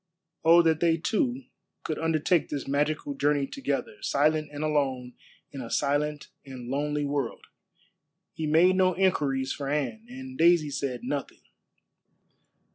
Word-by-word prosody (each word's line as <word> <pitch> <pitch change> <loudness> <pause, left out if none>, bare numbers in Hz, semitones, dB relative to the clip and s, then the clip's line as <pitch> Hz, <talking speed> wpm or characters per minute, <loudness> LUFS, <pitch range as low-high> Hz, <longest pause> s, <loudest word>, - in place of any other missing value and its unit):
Oh 170 +1 +7
that 160 -1 +2
they 165 -1 +3
two 245 - -1 0.4
could 155 - -3
undertake 165 +1 +1
this 140 -2 -4
magical 145 +1 -1
journey 145 0 +1
together, 395 - -4
silent 155 - +1
and 145 +1 -5
alone 135 -5 -1 0.4
in 135 - -7
a 115 - -7
silent 145 +2 -1
and 130 -3 -9
lonely 145 +2 -1
world. 140 -4 -3 0.9
He 160 - -3
made 170 +5 +5
no 185 -1 +3
inquiries 140 -8 +1
for 140 -2 -5
Anne, 150 - -2
and 260 +1 -9
Daisy 170 -3 +4
said 130 -3 -3
nothing. 145 -1 -4
150 Hz, 135 wpm, -27 LUFS, 140-170 Hz, 0.9 s, Oh